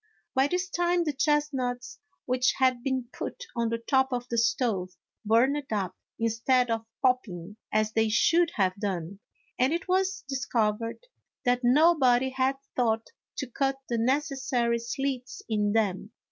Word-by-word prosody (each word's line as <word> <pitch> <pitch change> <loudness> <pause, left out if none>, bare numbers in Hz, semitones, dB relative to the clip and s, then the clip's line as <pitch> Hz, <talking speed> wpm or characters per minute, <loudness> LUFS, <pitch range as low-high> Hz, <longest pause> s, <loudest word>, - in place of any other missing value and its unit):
By 265 +1 +3
this 360 +4 -1
time, 350 -1 +1
the 300 -3 -1
chestnuts 275 -4 -1 0.3
which 255 0 +2
had 255 -2 +2
been 260 -2 -2
put - - -6
on 235 -1 0
the 230 - -1
top 265 +3 +1
of 245 -1 -2
the 235 - -1
stove 225 -5 +1 0.3
burned 250 +7 +3
up, 190 -4 -1 0.2
instead 230 +2 +1
of 225 0 -2 0.2
pop 255 -1 +4
ping 185 0 -9
as 215 0 +1
they 220 0 +2
should 335 +9 +3
have 190 -3 +2
done, 195 -2 -3 0.4
and 255 +3 +3
it 340 - -3
was 380 +1 +1
discovered 230 - -1 0.4
that 245 0 +2
nobody 265 -2 +4
had 260 +1 +1 0.2
thought 225 -2 0 0.3
to - - -2
cut 270 +2 0
the 235 -1 0
necessary 255 -2 0
slits 255 +2 -4
in 210 -2 +1
them. 210 -1 0
245 Hz, 150 wpm, -28 LUFS, 225-270 Hz, 0.4 s, pop